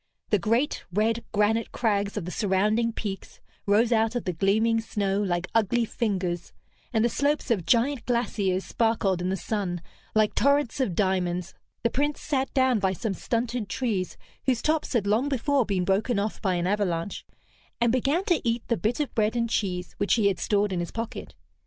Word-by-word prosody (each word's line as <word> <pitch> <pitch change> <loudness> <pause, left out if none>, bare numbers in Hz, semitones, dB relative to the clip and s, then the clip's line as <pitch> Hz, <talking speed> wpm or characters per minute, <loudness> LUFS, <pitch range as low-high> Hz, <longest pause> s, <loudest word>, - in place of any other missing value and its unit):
The 210 - +4
great, 230 - 0
red 220 +4 +1
granite 220 +2 +1
crags 205 -3 0
of 195 - -3
the 180 - -5
surrounding 215 +4 +1
peaks 205 -3 -6 0.3
rose 220 +4 +4
out 225 +1 +2
of 245 - -1
the 180 - -2
gleaming 220 +6 +2
snow 200 -2 -1
like 175 -3 0
ugly 230 +2 +2
fingers, 185 -7 -2 0.4
and 225 -2 +2
the - - +5
slopes 285 +2 0
of 185 -7 0
giant 240 +5 +2
glaciers 205 -6 0
sparkled 220 -5 +1
in 180 - -1
the 190 - 0
sun 190 -4 -2 0.4
like 215 -1 +3
torrents 280 0 +2
of 215 -10 0
diamonds. 180 -2 0 0.3
The 235 - +2
Prince 290 +2 0
sat 270 -3 -1
down 260 -4 +3
by 190 -1 +1
some 210 +2 -2
stunted 230 0 -2
trees 205 -7 -2 0.3
whose 250 -3 +1
tops 310 -1 0
had 230 -5 +1
long 220 +8 +2
before 275 -1 +1
been 190 -3 0
broken 200 +5 +1
off 205 +2 -2
by 190 -4 +1
an 175 0 -1
avalanche, 190 -2 -1 0.6
and 235 -1 +3
began 275 +9 +1
to 345 - +2
eat 230 -1 0
the 235 - +2
bit 230 +5 -1
of 295 - -2
bread 220 0 +1
and 235 -1 +1
cheese 180 -5 -1
which 205 - +3
he 215 -4 +3
had 185 -3 -2
stored 205 0 +1
in 180 - -1
his 175 - -3
pocket. 230 0 -6
220 Hz, 190 wpm, -26 LUFS, 195-235 Hz, 0.6 s, the